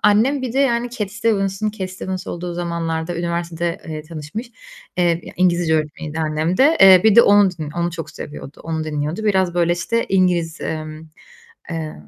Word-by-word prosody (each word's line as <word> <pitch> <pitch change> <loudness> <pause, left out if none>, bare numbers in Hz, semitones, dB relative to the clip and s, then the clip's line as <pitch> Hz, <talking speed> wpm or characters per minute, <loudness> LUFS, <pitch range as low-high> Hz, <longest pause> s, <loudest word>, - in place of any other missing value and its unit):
annem 240 +7 +3
bir 250 -3 -3
de 265 - -1
yani 245 -3 +1
Cat 210 -5 -4
Stevens'ın 210 -1 0
Cat 190 -3 -5
Stevens 185 0 -5
olduğu 175 0 -5
zamanlarda 170 -1 -3
üniversitede, 170 0 -2
eee, 155 -1 -5
tanışmış, 160 - -7 0.5
eee, 170 -2 +2
ya - - -9
İngilizce 175 -2 +2
öğretmeniydi 155 0 -3
annem 155 +3 0
de. 295 - +5
Eee 190 -1 +9
bir 220 -2 +6
de 235 - +10
onu 205 -2 +5
din 160 -4 -7
onu 170 +2 -1
çok 165 -1 -7
seviyordu, 145 -1 -9
onu 160 -1 -2
dinliyordu. 155 +6 -3
Biraz 190 -4 +2
böyle 175 -1 +2
işte 230 +7 -1
İngiliz, 175 -3 +1
emm, 155 -1 -5 0.7
eee, 160 -2 -4
175 Hz, 175 wpm, -20 LUFS, 160-205 Hz, 0.7 s, de